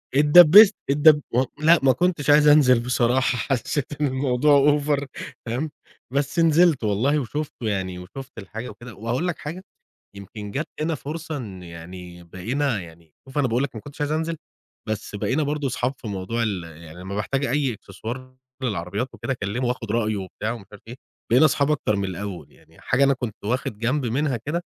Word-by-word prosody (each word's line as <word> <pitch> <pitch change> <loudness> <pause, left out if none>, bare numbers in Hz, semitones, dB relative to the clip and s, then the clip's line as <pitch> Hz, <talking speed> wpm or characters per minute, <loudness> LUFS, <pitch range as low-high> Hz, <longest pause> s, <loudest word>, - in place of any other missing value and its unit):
اتدبّست، 175 +8 +8
اتدب 150 +1 +6
و 125 +2 +3 0.2
لأ، 165 +1 +6
ما 135 - +6
كنتش 165 -1 0
عايز 150 +1 +6
أنزِل 140 -5 +6
بصراحة، 125 +1 +1
حسّيت 135 +3 -1 0.2
إن 150 - +3
الموضوع 140 +2 +3
over 145 -1 0 0.4
تمام، 130 +7 -2 0.4
بس 140 +3 0
نزِلت 165 -4 +4
والله 115 +9 +1
وشُفته 140 -2 -4
يعني 95 -3 -2
وشُفت 125 +9 -10
الحاجة 115 +4 -7
وكده 120 +3 -11
وهاقول 120 - -2
لك 175 - -2
حاجة، 165 +5 -6 0.5
يمكن 100 +1 -8
جَات 145 +8 -3
هنا 160 +1 0
فرصة 155 +2 -6
إن 95 -7 -8
يعني 85 +1 -10
بقينا 115 - -2
يعني 80 -2 -15
شوف 135 +2 -9
أنا 140 - +3
باقول 120 +3 0
لك 135 -4 -4
ما 110 - -6
كنتش 145 +3 -10
عايز 145 +1 0
أنزِل، 160 +1 -1 0.5
بس 110 -1 -4
بقينا 135 +9 0
برضه 145 -1 -1
صحاب 125 +1 -1
في 115 - -9
موضوع 100 +4 -2
ال 100 -6 -2
يعني، 80 +1 -12
لمّا 95 +2 -6
باحتاج 135 +7 -1
أي 135 -1 0
إكسسوار 120 +6 -8 0.3
للعربيات 100 0 -2
وكده 115 +3 -3
أكلّمه 120 +2 -3
وآخُد 120 -3 -3
رأيه 110 -2 0
وبتاع 100 +3 -4
ومش 115 -4 -8
عارف 105 - -14
إيه، 120 - -8 0.4
بقينا 130 +6 +7
صحاب 140 0 +1
أكتر 135 -8 0
من 100 0 -1
الأول، 95 -4 -6
يعني - - -22
حاجة 125 +2 +2
أنا 140 0 +4
كنت 120 -5 -5
واخِد 115 -1 -2
جنب 130 +4 0
منها 130 +2 0
كده، 150 +10 -3
125 Hz, 180 wpm, -23 LUFS, 105-145 Hz, 0.5 s, اتدبّست